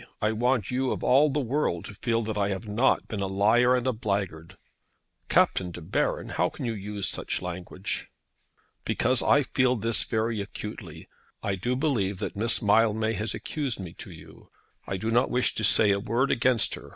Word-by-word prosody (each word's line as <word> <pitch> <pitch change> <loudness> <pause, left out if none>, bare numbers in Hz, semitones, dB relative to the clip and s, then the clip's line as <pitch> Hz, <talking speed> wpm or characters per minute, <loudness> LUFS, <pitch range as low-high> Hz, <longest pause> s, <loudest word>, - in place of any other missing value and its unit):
I 105 - +1
want 120 -1 0
you 130 +1 0
of - - -3
all 145 +4 +5
the 145 +2 -1
world 130 - -1
to - - -9
feel 115 +2 -1
that 110 0 -4
I 100 -1 0
have 100 +3 -4
not 110 +6 +1
been 105 - -5
a 100 - -1
liar 110 +6 +3
and 125 -1 -1
a 130 - +1
blackguard." 95 -5 -3 0.7
"Captain 90 - +2
De 90 - -8
Baron! 85 +3 -2
how - - 0
can - - -7
you 115 - -1
use 105 -1 -3
such - - -2
language?" 90 +1 -5 0.7
"Because 125 0 +1
I 145 - +4
feel 130 -1 +1
this 115 -4 +2
very 110 -1 -1
acutely. 100 -5 -8 0.4
I 100 - -1
do 120 +7 -2
believe 120 -9 0
that - - -5
Miss 115 +3 +2
Mildmay 110 +1 +3
has 105 +1 -2
accused 140 -8 -3
me 90 -3 -7
to - - -7
you. 80 -2 -14 0.4
I 95 - -2
do 110 +4 -3
not 120 +3 +3
wish 125 0 +2
to 110 - -3
say 105 0 +6
a 100 - +1
word 120 +7 0
against 120 -2 +2
her. - - -8
110 Hz, 195 wpm, -26 LUFS, 100-125 Hz, 0.7 s, say